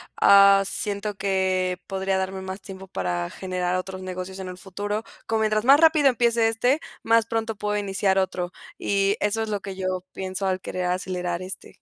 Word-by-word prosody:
ah, 200 0 +7
siento 205 +1 -3
que 185 -2 0
podría 190 0 -1
darme 190 0 -2
más 190 +1 -6
tiempo 195 -1 -10
para 90 - -2
generar 180 -1 -2
otros 185 0 -4
negocios 185 +1 -6
en 190 - -5
el 180 0 -7
futuro, 205 +3 -4 0.2
como 225 -1 +1
mientras 215 +1 +1
más 280 +4 +7
rápido 315 -3 +6
empiece 235 -3 +3
este, 245 +6 +2 0.2
más 230 0 +4
pronto 225 -1 -2
puedo 210 0 -1
iniciar 195 -1 0
otro, 185 -1 -1 0.2
y 200 +1 +1
eso 210 +2 0
es 220 - -5
lo 205 -1 -1
que 195 +1 -7
yo 185 -1 -3
pienso 190 +1 -3
al 185 0 -1
querer 180 0 -3
acelerar 180 -1 -2
este. 185 +1 -9
195 Hz, 185 wpm, -24 LUFS, 185-210 Hz, 0.2 s, ah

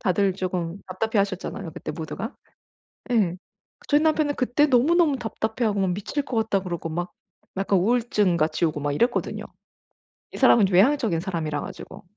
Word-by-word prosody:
다들 195 -1 +2
쪼금 180 -2 -3
답답해하셨잖아요 195 -2 -2
그때 175 - -6
모두가. 180 +7 -6 0.8
예. 200 -8 +2 0.5
저희 290 +1 +4
남편은 310 -2 +2
그때 255 +3 +2
너무너무 290 +3 +3
답답해하고 220 -2 -2
막 190 -2 +1
"미칠 205 +10 -3
것 250 -4 -4
같다." 220 -3 +1
그러고 170 -2 -4
막 175 +3 -4 0.4
약간 195 0 +2
우울증같이 195 -7 +1
오고 155 -2 -2
막 145 - -1
이랬거든요. 235 - 0 0.9
이 - - -8
사람은 220 -4 +6
좀 185 - 0
외향적인 220 - +3
사람이라 160 -5 -3
가지고. - - -9
200 Hz, 370 characters per minute, -24 LUFS, 175-240 Hz, 0.9 s, 사람은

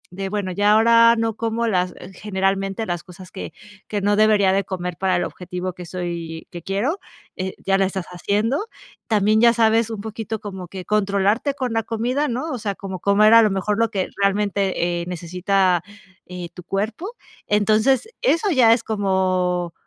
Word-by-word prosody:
de 195 0 -4
bueno, 200 -2 -2
ya, 205 +3 +3
ahora 230 +1 +6
no 225 0 0
como 230 +1 -1
las 180 -5 0 0.3
generalmente, 195 +1 -1
las 175 -3 -3
cosas 180 0 -13
que 190 - -7 0.4
que 210 - -2
no 205 +1 +2
debería 210 -2 +4
de 195 +1 +1
comer 180 -2 -4
para 190 -1 +1
el 175 - +1
objetivo 180 +1 -5
que 180 -1 -10
soy, 170 -2 -5
que 175 - -8
quiero, 210 - -1 0.4
eh, 185 0 -4
ya 195 0 +2
la 195 - +3
estás 190 -1 -3
haciendo. 215 - -1 0.4
También 215 -1 +3
ya 235 0 +6
sabes 225 -1 +3
un 220 -3 -5
poquito 220 0 -5
cómo 190 -3 -7
que 185 +1 -8
controlarte 210 +6 +1
con 255 -4 -3
la 225 - +1
comida, 240 +6 -1
¿no? 260 +6 -3
O 255 - -4
sea, 205 -2 -3
como 190 -1 -7
comer 210 +3 +4
a 230 - +9
lo 215 - +4
mejor 200 +2 -1
lo 230 0 +2
que 195 -4 -2
realmente, 195 -3 0
eh, - - -5
necesita 180 +1 0 0.7
tu 180 - -10
cuerpo. 215 - -3 0.4
Entonces, 215 - +2
eso 415 -4 +2
ya 250 -7 +5
es 230 -1 0
como 185 -4 0
200 Hz, 180 wpm, -21 LUFS, 185-225 Hz, 0.7 s, a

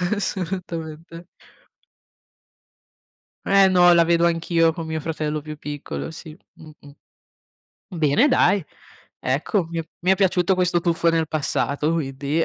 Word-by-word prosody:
Assolutamente. 170 -4 -5 2.2
Eh 195 -1 +5
no, 175 -1 +5
la 170 0 +5
vedo 170 0 +2
anch'io 165 0 +1
con 165 -1 -7
mio 160 0 -3
fratello 155 -1 -3
più 155 0 -8
piccolo, 150 +2 -6
sì, 160 0 -11 0.2
mh-mh. 150 -2 -16 1.0
Bene 155 - +3
dai, 200 - +3 0.6
ecco, 160 +8 -1
mi 165 - -3
è 165 - -6
mi 185 +2 +2
è - - +4
piaciuto 185 -1 +2
questo 180 -1 +1
tuffo 170 -1 +1
nel 165 -1 0
passato, 150 0 -1
quindi 145 +1 -1
165 Hz, 125 wpm, -22 LUFS, 155-175 Hz, 2.2 s, Eh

